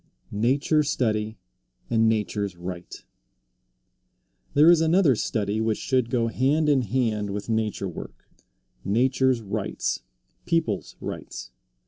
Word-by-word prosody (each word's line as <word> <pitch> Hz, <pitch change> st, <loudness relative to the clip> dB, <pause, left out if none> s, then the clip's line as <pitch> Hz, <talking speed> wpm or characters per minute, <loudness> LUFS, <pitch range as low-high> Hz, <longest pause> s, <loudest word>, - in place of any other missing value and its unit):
NATURE 135 Hz, +8 st, +2 dB
STUDY 110 Hz, -6 st, -1 dB, 0.5 s
AND 115 Hz, -1 st, +3 dB
NATURE'S 105 Hz, -3 st, -1 dB
RIGHT. 90 Hz, 0 st, -8 dB, 1.5 s
There 155 Hz, +4 st, +8 dB
is 170 Hz, -2 st, +5 dB
another 165 Hz, -4 st, +4 dB
study 105 Hz, 0 st, -1 dB
which 110 Hz, -1 st, 0 dB
should 130 Hz, -3 st, 0 dB
go 120 Hz, -2 st, +1 dB
hand 135 Hz, +7 st, +1 dB
in 140 Hz, -3 st, +4 dB
hand 110 Hz, -3 st, -1 dB
with 100 Hz, +2 st, -5 dB
nature 110 Hz, -3 st, -1 dB
work 90 Hz, -, -9 dB, 0.6 s
nature's 130 Hz, +3 st, +2 dB
rights, 100 Hz, -2 st, -2 dB, 0.5 s
people's 160 Hz, -, -1 dB
rights. -, -, -7 dB
115 Hz, 110 wpm, -25 LUFS, 105-130 Hz, 1.5 s, There